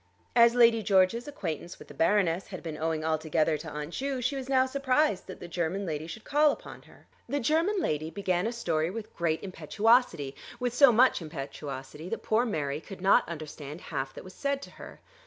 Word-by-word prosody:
As 235 Hz, 0 st, +6 dB
Lady 230 Hz, -2 st, +6 dB
George's 200 Hz, +5 st, +3 dB
acquaintance 175 Hz, -, -5 dB
with -, -, -13 dB
the -, -, -11 dB
Baroness 175 Hz, +2 st, +2 dB
had 185 Hz, -3 st, -8 dB
been 160 Hz, -2 st, -5 dB
owing 160 Hz, 0 st, -2 dB
altogether 155 Hz, 0 st, +1 dB
to 160 Hz, -, -7 dB
Aunt 150 Hz, +1 st, -6 dB
Ju 270 Hz, -1 st, -2 dB
she 255 Hz, +3 st, -1 dB
was 265 Hz, -1 st, -5 dB
now 260 Hz, -1 st, +4 dB
surprised 270 Hz, -4 st, +1 dB
that 185 Hz, -, -9 dB
the -, -, -8 dB
German 175 Hz, +3 st, -2 dB
lady 155 Hz, -2 st, -4 dB
should 215 Hz, +6 st, -8 dB
call 295 Hz, +1 st, +4 dB
upon -, -, -9 dB
her. -, -, -20 dB, 0.2 s
The 285 Hz, +3 st, 0 dB
German 325 Hz, -, +2 dB
lady 155 Hz, -, -1 dB
began 185 Hz, +1 st, -1 dB
a -, -, -1 dB
story 165 Hz, -9 st, -1 dB
with 215 Hz, +2 st, -7 dB
great 165 Hz, -2 st, -1 dB
impetuosity, 190 Hz, -, +1 dB, 0.2 s
with 245 Hz, -1 st, -1 dB
so 275 Hz, 0 st, +7 dB
much 245 Hz, -2 st, +4 dB
impetuosity 145 Hz, 0 st, -7 dB
that 225 Hz, -, -4 dB
poor 225 Hz, +3 st, +2 dB
Mary 150 Hz, -7 st, -2 dB
could 195 Hz, +2 st, -10 dB
not 190 Hz, -1 st, +4 dB
understand 155 Hz, -2 st, -7 dB
half 135 Hz, -6 st, -4 dB
that -, -, -8 dB
was 185 Hz, -, -11 dB
said 280 Hz, -1 st, -1 dB
to -, -, -10 dB
her. -, -, -12 dB
185 Hz, 200 wpm, -29 LUFS, 155-245 Hz, 0.2 s, so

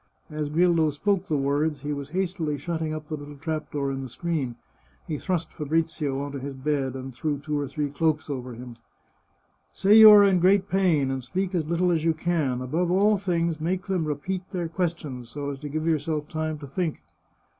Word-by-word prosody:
As 150 Hz, -1 st, -3 dB
Grillo 165 Hz, 0 st, +3 dB
spoke 195 Hz, +6 st, 0 dB
the 155 Hz, -, +1 dB
words 145 Hz, +1 st, 0 dB
he 145 Hz, +1 st, -2 dB
was 140 Hz, -1 st, -6 dB
hastily 175 Hz, -4 st, -1 dB
shutting 160 Hz, +1 st, -3 dB
up 155 Hz, -1 st, -5 dB
the 155 Hz, -, -3 dB
little 145 Hz, 0 st, -9 dB
trap 155 Hz, +1 st, -4 dB
door 140 Hz, -2 st, -1 dB
in 135 Hz, 0 st, -3 dB
the 130 Hz, -, -6 dB
screen. 150 Hz, -4 st, -2 dB, 0.5 s
He 150 Hz, -3 st, -3 dB
thrust 175 Hz, -4 st, -2 dB
Fabrizio 155 Hz, -2 st, -1 dB
on 145 Hz, 0 st, -4 dB
to 140 Hz, -, -5 dB
his 135 Hz, +1 st, -6 dB
bed, 135 Hz, -1 st, -1 dB
and 130 Hz, 0 st, -6 dB
threw 145 Hz, +3 st, -2 dB
two 150 Hz, +1 st, -3 dB
or 145 Hz, -, -2 dB
three 145 Hz, +1 st, -3 dB
cloaks 155 Hz, +1 st, 0 dB
over 130 Hz, -4 st, -5 dB
him. 120 Hz, 0 st, -10 dB, 0.5 s
" -, -, -42 dB
Say 195 Hz, +2 st, +3 dB
you 220 Hz, -1 st, +12 dB
are 210 Hz, -1 st, +9 dB
in 195 Hz, -2 st, +4 dB
great 190 Hz, +2 st, +4 dB
psin, 170 Hz, -8 st, +2 dB
and 130 Hz, -1 st, -3 dB
speak 185 Hz, +8 st, -2 dB
as 165 Hz, -4 st, 0 dB
little 175 Hz, +1 st, +2 dB
as 160 Hz, -2 st, +1 dB
you 165 Hz, -1 st, +2 dB
can. 155 Hz, -7 st, 0 dB
Above 160 Hz, +8 st, -1 dB
all 200 Hz, +3 st, +4 dB
things, 170 Hz, -4 st, -1 dB
make 180 Hz, +3 st, -1 dB
them 185 Hz, -4 st, 0 dB
repeat 155 Hz, +5 st, -2 dB
their 175 Hz, -3 st, -3 dB
questions, 160 Hz, -8 st, -3 dB
so 145 Hz, +1 st, -4 dB
as 135 Hz, -, -7 dB
to 145 Hz, +1 st, -6 dB
give 155 Hz, +2 st, -2 dB
yourself 155 Hz, -1 st, 0 dB
time 155 Hz, 0 st, -3 dB
to 145 Hz, -, -9 dB
think." 160 Hz, +3 st, -3 dB
155 Hz, 210 wpm, -26 LUFS, 140-175 Hz, 0.5 s, you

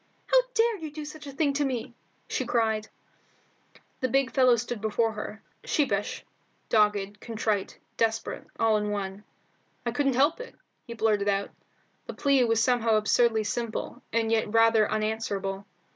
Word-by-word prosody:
"How -, -, +5 dB
dared 450 Hz, -4 st, +2 dB
you 315 Hz, -, -5 dB
do 300 Hz, 0 st, -7 dB
such 300 Hz, 0 st, -9 dB
a -, -, -6 dB
thing 280 Hz, +1 st, +1 dB
to 290 Hz, +1 st, +1 dB
me?" 250 Hz, -2 st, -3 dB, 0.3 s
she -, -, -1 dB
cried. 220 Hz, -2 st, 0 dB, 1.1 s
The 255 Hz, -, 0 dB
big 270 Hz, +1 st, +2 dB
fellow 255 Hz, -3 st, +5 dB
stood 235 Hz, -1 st, -4 dB
before 220 Hz, +1 st, +1 dB
her, 215 Hz, 0 st, -7 dB, 0.2 s
sheepish, 205 Hz, -9 st, -1 dB, 0.4 s
dogged, 205 Hz, -2 st, +2 dB
contrite, 215 Hz, -4 st, -2 dB, 0.2 s
desperate, 225 Hz, -1 st, -1 dB
all 225 Hz, -1 st, +4 dB
in 210 Hz, 0 st, -2 dB
one. 200 Hz, 0 st, -4 dB, 0.6 s
"I 235 Hz, -, 0 dB
couldn't 275 Hz, +1 st, +1 dB
help 290 Hz, -, +3 dB
it," -, -, -9 dB, 0.3 s
he 235 Hz, -, -6 dB
blurted 210 Hz, -3 st, +1 dB
out. 200 Hz, 0 st, 0 dB, 0.6 s
The -, -, -6 dB
plea 275 Hz, -3 st, +3 dB
was 225 Hz, -1 st, +2 dB
somehow 230 Hz, -3 st, +3 dB
absurdly 220 Hz, +1 st, +3 dB
simple, 235 Hz, +3 st, -4 dB
and 225 Hz, -1 st, +1 dB
yet 220 Hz, -2 st, +1 dB
rather 225 Hz, -1 st, +4 dB
unanswerable. 205 Hz, -3 st, -2 dB
225 Hz, 155 wpm, -27 LUFS, 215-260 Hz, 1.1 s, How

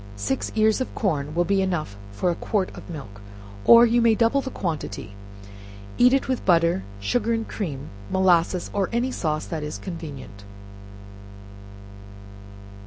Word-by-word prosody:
Six 100 Hz, +6 st, -2 dB
ears 220 Hz, +2 st, +3 dB
of 260 Hz, -, -4 dB
corn 150 Hz, -7 st, -1 dB
will 175 Hz, 0 st, +2 dB
be 200 Hz, 0 st, +2 dB
enough 175 Hz, -, -2 dB, 0.2 s
for 175 Hz, -, 0 dB
a -, -, -2 dB
quart 195 Hz, 0 st, -2 dB
of -, -, -11 dB
milk, 105 Hz, -11 st, -9 dB, 0.4 s
or 235 Hz, 0 st, +9 dB
you 235 Hz, +1 st, +3 dB
may 230 Hz, -1 st, +4 dB
double 235 Hz, +5 st, +2 dB
the 270 Hz, -, -5 dB
quantity; 155 Hz, -, -4 dB, 0.9 s
eat 250 Hz, +1 st, +7 dB
it 270 Hz, 0 st, +1 dB
with 260 Hz, -1 st, -1 dB
butter, 170 Hz, -, +3 dB, 0.2 s
sugar 230 Hz, -, 0 dB
and 225 Hz, -1 st, -2 dB
cream, 145 Hz, -9 st, -5 dB, 0.2 s
molasses, 180 Hz, -1 st, +2 dB
or 195 Hz, -2 st, 0 dB
any 240 Hz, +3 st, 0 dB
sauce 155 Hz, -8 st, -2 dB
that 160 Hz, -2 st, -4 dB
is 150 Hz, 0 st, -5 dB
convenient. 140 Hz, -, -8 dB
180 Hz, 150 wpm, -24 LUFS, 150-225 Hz, 0.9 s, or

